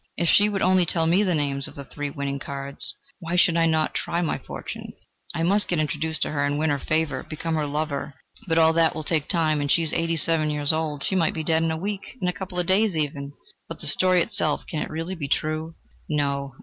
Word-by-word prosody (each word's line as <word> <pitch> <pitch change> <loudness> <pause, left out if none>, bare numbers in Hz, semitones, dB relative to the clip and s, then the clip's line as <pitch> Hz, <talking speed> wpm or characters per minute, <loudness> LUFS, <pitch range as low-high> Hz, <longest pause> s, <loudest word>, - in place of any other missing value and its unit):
if 170 - 0
she 205 +5 +5
would 200 -2 -1
only 185 0 +4
tell 165 -1 +1
me 175 +5 +3
the 185 -4 +1
names 140 -2 -1
of - - -12
the 140 - -7
three 145 +2 -5
winning 140 0 -4
cards. 140 0 -1 0.2
Why 170 -1 -3
should 175 -1 +4
I 165 -1 +3
not 160 -1 +1
try 170 +1 -1
my 160 - -1
fortune? - - -8 0.4
I 165 - -1
must 200 +4 +3
get 175 - 0
introduced 155 +1 0
to - - -3
her 145 -1 -1
and 145 0 0
win 155 0 +1
her 140 - 0
favour 155 -2 -1
become 165 +1 -3
her 155 -2 0
lover... 145 -1 -3 0.3
But 165 -1 +1
all 160 0 +5
that 165 -1 +2
will 155 - -4
take 155 -2 0
time, 155 -4 +2
and 145 - -2
she 165 - +3
is 160 - +3
eighty 165 0 0
seven 160 -1 +3
years 150 0 +3
old: 155 -3 -2
she 190 - -1
might 170 -4 +1
be 160 - -3
dead 160 +1 +2
in 165 - +1
a 160 - -2
week, 200 +7 -5
in 180 - -1
a 180 - 0
couple 185 -1 -7
of 175 - 0
days 190 0 +2
even!... 145 -2 -3 0.4
But 165 - -6
the - - -5
story 180 +4 +4
itself: 155 -2 +1
can 155 - -3
it - - -4
really 165 +4 -4
be 155 -6 -5
true?... 155 +3 -2 0.3
No! 140 -3 -1
160 Hz, 250 wpm, -24 LUFS, 145-170 Hz, 0.4 s, she